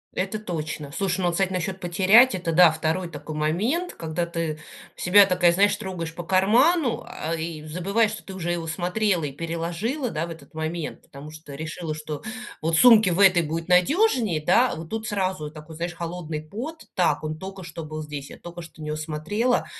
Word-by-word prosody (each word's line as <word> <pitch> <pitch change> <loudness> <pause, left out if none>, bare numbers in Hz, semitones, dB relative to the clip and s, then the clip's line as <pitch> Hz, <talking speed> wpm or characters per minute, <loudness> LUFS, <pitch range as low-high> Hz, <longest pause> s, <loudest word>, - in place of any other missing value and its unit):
Это 195 +3 -1
точно. 155 -7 -5
Слушай, 190 +4 -1
ну 180 - +1
вот, 175 - +2
кстати, 190 +2 0
насчет 185 +1 -3
потерять- 195 +8 +5
это 175 -2 -2
да, 170 0 +7
2 160 +3 -1
такой 150 0 -7
момент, 215 - 0
когда 165 +1 -3
ты 165 -2 -3 0.4
себя 200 +3 +6
такая, 180 -2 +4
знаешь, 200 +4 +4
такая 210 - -7
трогаешь 165 -2 -5
по 175 0 -6
карману, 240 - +3
а, 165 +2 -4
и 160 -1 -4
забываешь, 200 +7 +1
что 215 - -8
ты 195 - -9
уже 175 -2 -3
его 170 -1 -3
смотрела 180 +1 0
и 140 - -3
переложила, 170 - -3
да, 160 +2 -2
в - - -8
этот 165 0 -12
момент, 160 0 -4
потому 140 +2 -11
что 155 -2 -11
решила, 155 +2 -5
что 155 -1 -6 0.4
вот 160 +1 +1
сумке 220 -5 +7
в 180 - 0
этой 185 -3 +6
будет 165 +2 -4
надежнее, 220 - +3
да, 240 +9 +4
а - - -4
вот 160 0 -8
тут 220 +2 -4
сразу 185 -7 -2
такой, 155 +1 -11
знаешь, 170 +1 -3
холодный 165 -2 -5
пот: 250 - -7
так, 160 -5 +2
он 155 0 -4
только 190 +2 -8
что 165 -1 -7
был 155 0 -6
здесь, 145 -2 -7
я - - -11
только 175 0 -9
что 160 -1 -13
на 155 - -6
него 150 0 -2
смотрела. 160 +11 -1
175 Hz, 205 wpm, -24 LUFS, 160-195 Hz, 0.4 s, да